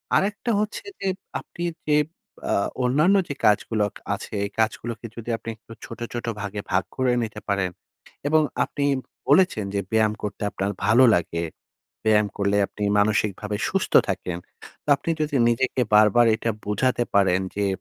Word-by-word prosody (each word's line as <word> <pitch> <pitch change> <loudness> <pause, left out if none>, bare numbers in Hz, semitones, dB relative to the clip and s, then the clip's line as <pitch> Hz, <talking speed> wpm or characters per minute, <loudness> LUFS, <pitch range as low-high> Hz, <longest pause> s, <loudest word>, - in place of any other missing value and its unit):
আরেকটা 205 +4 +1
হচ্ছে 215 - -3
যে 195 - -2 0.3
আপনি 170 - -8 0.2
যে 150 0 +4 0.5
আ - - +3 0.3
অন্যান্য 155 +10 +4
যে 145 - -3
কাজগুলো 105 0 +3
কা - - -13
আছে, - - -10
এ - - -2
কাজগুলোকে 115 +1 -1
যদি 115 0 -7
আপনি 115 - -8
একটু 115 - -19
ছোট, 115 - -9
ছোট 120 - -4 0.2
ভাগে 105 0 -4
ভাগ 95 - +2
করে 130 -1 +2
নিতে 110 - -5
পারেন 100 -2 +1 0.6
এবং 155 +1 +4 0.2
আপনি 145 - -2 0.4
বলেছেন 145 - +4
যে - - +2
ব্যায়াম 110 -1 +3
করতে 105 - -5
আপনার 100 +1 -2
ভালো 115 +5 +6
লাগে। 85 -1 -1 0.6
ব্যায়াম 105 -1 +4
করলে 100 0 +1
আপনি 105 - -5
মানসিকভাবে 105 0 +1
সুস্থ - - -1 0.2
থাকেন। 90 -2 -2 0.5
তো - - -24
আপনি 165 - -4
যদি 150 -2 0
নিজেকে 125 +2 +1
বারবার 105 +3 +6
এটা 115 - -1
বুঝাতে 120 +4 +1
পারেন 95 -2 +4 0.2
যে, 100 -1 +1
110 Hz, 160 wpm, -24 LUFS, 105-130 Hz, 0.6 s, ভালো